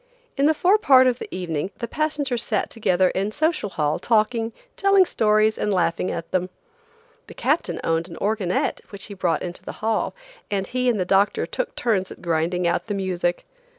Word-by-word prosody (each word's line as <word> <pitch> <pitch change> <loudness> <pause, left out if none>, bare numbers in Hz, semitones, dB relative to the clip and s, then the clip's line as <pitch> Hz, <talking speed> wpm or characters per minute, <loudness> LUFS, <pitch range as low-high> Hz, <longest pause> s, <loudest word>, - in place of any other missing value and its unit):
In 280 +1 +3
the 315 - +3
forepart 350 -9 +5
of 250 -1 +2
the - - -6
evening 175 -2 -3
the 235 - -4
passengers 290 -3 -1
sat 215 -4 -1
together 185 -5 +2
in 195 +2 -1
Social 310 -4 0
Hall 150 -4 -1
talking, 225 0 +1 0.2
telling 395 -1 +5
stories 215 -5 +2
and 210 - 0
laughing 180 -1 +1
at 165 -1 -5
them. 185 0 0 0.8
The - - -12
captain - - 0
owned 165 +1 0
an 170 - -10
organette 200 -3 0
which 200 -2 -7
he 205 - -8
brought 175 -5 0
into 175 -1 -6
the - - -7
hall, 220 0 -1 0.3
and 195 -2 -1
he 250 +4 0
and 225 -4 +1
the 185 - 0
doctor 195 +2 +2
took - - -4
turns 200 -6 0
at - - -10
grinding 170 +1 0
out 170 +5 0
the 205 - -2
music. 180 -2 -1
205 Hz, 185 wpm, -23 LUFS, 180-245 Hz, 0.8 s, forepart